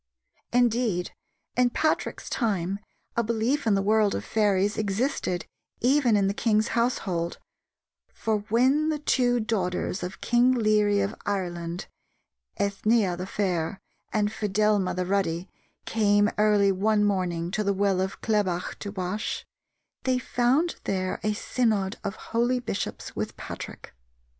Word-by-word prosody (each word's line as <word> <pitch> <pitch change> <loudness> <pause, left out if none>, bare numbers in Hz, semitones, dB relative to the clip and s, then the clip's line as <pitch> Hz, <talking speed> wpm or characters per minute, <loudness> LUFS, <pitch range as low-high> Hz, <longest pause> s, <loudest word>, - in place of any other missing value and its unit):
Indeed, 235 -7 +2 0.4
in 250 0 +4
Patrick's 310 +5 -1
time 200 -5 -1 0.4
a 235 - +3
belief 230 +5 0
in 205 -2 +4
a 195 - 0
world 215 0 +3
of 100 - -4
fairies 205 - +2
existed 205 - -1 0.3
even 250 -3 +4
in 200 - +2
the 195 - +1
king's 215 0 +1
household, 195 -8 0 0.7
for 220 -1 -1
"when 265 +7 +3
the 310 - 0
two 245 -4 +2
daughters 190 -5 -1
of 180 +1 -5
King 245 +1 +3
Leary 210 -3 +3
of 200 +2 -1
Ireland, 175 -3 -3 0.7
Ethnea 200 -1 +2
the 180 +2 -5
fair 185 -2 -1 0.3
and 210 -1 +1
Fedelma 210 -2 +1
the 180 0 -1
ruddy, 185 -2 0 0.4
came 205 -1 +3
early 210 -2 +4
one 210 +2 +2
morning 180 -4 0
to 215 - 0
the 200 - +1
well 195 -1 +1
of 190 +1 -3
Clebach 200 -5 0
to 200 - -5
wash, 190 +2 -3 0.6
they 255 -1 +1
found 250 +7 +1
there 185 -1 -1
a 215 0 0
synod 215 -3 0
of 200 0 -3
holy 240 +2 0
bishops 220 -5 -4
with - - -4
Patrick. - - -8
210 Hz, 135 wpm, -26 LUFS, 190-230 Hz, 0.7 s, in